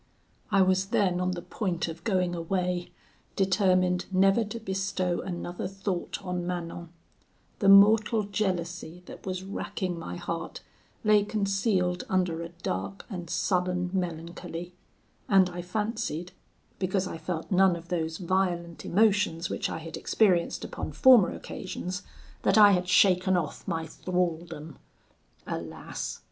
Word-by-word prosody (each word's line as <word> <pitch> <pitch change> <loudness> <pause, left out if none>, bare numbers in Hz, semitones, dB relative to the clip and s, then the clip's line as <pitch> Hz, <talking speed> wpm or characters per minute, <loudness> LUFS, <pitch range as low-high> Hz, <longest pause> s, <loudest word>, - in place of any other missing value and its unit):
"I 195 -1 +5
was 185 +1 +2
then 185 -3 +1
on 180 0 0
the 175 -1 -6
point 180 -2 -2
of 165 0 -7
going 185 -5 +1
away, 180 +1 -1 0.5
determined 185 -2 +2
never 195 +4 +4
to 220 +2 -6
bestow 190 -3 -1
another 175 -1 -4
thought 195 -2 -3
on 180 -1 -3
Manon: 170 -1 -4 0.7
the 195 - +4
mortal 210 +2 +6
jealousy 180 -4 -3
that - - -11
was 185 0 -3
racking 185 -2 -4
my 90 - -6
heart - - -5 0.4
lay 210 -1 +5
concealed 195 -3 0
under 180 -3 +1
a 170 - -5
dark 170 - -5
and 175 -4 -6
sullen 180 +1 0
melancholy, 170 0 -4 0.6
and 190 -2 +5
I 175 0 -5
fancied, 180 -3 -3 0.5
because 190 0 0
I 165 - -6
felt 160 +2 -4
none 190 -1 +5
of 170 0 -10
those 160 -2 -2
violent 175 -2 -1
emotions 195 -4 +2
which - - -1
I - - -3
had 160 0 -7
experienced 185 -6 +2
upon - - -5
former 250 -7 +7
occasions, 185 0 -5 0.4
that 195 - +3
I 205 -1 +9
had 180 -2 +1
shaken 185 0 +4
off 160 -4 -4
my 165 -1 -2
thraldom. 165 -3 -3 0.7
Alas! - - -5
180 Hz, 135 wpm, -28 LUFS, 175-195 Hz, 0.7 s, I